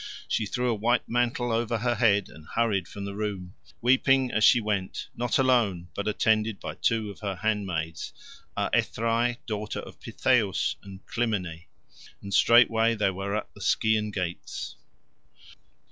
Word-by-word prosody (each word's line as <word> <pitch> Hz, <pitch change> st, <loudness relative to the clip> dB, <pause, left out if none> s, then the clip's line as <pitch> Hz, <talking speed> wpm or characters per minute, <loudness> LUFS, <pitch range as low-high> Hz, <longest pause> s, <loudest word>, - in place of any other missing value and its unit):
She 110 Hz, -, 0 dB
threw 125 Hz, +4 st, -1 dB
a 120 Hz, -, +2 dB
white 115 Hz, +3 st, +1 dB
mantle 120 Hz, 0 st, 0 dB
over 115 Hz, 0 st, 0 dB
her 120 Hz, +2 st, 0 dB
head, 105 Hz, -5 st, +3 dB
and 80 Hz, -1 st, -14 dB
hurried 105 Hz, -6 st, +1 dB
from 100 Hz, -1 st, -7 dB
her 100 Hz, -, -5 dB
room, 100 Hz, -3 st, -4 dB, 0.3 s
weeping 130 Hz, +1 st, +3 dB
as 110 Hz, -, +1 dB
she 120 Hz, -, +7 dB
went, 105 Hz, -4 st, -3 dB
not 120 Hz, 0 st, 0 dB
alone, 115 Hz, -10 st, +2 dB
but 100 Hz, -, -4 dB
attended 110 Hz, 0 st, +1 dB
by -, -, -5 dB
two 110 Hz, -3 st, 0 dB
of -, -, -13 dB
her 100 Hz, -2 st, -3 dB
handmaids, 90 Hz, -6 st, -2 dB, 0.5 s
Aethrae, 115 Hz, +1 st, +1 dB
daughter 105 Hz, -1 st, -4 dB
of -, -, -12 dB
Pittheus, 115 Hz, -7 st, +1 dB
and 95 Hz, 0 st, -12 dB
Clymene. 90 Hz, -8 st, -2 dB, 0.5 s
And 100 Hz, 0 st, -7 dB
straightway 115 Hz, 0 st, +5 dB
they 105 Hz, -3 st, +1 dB
were 100 Hz, +2 st, -3 dB
at 110 Hz, -, -4 dB
the -, -, -14 dB
Scaean 110 Hz, -1 st, +2 dB
gates. 90 Hz, -3 st, -5 dB
110 Hz, 150 wpm, -27 LUFS, 100-120 Hz, 0.5 s, she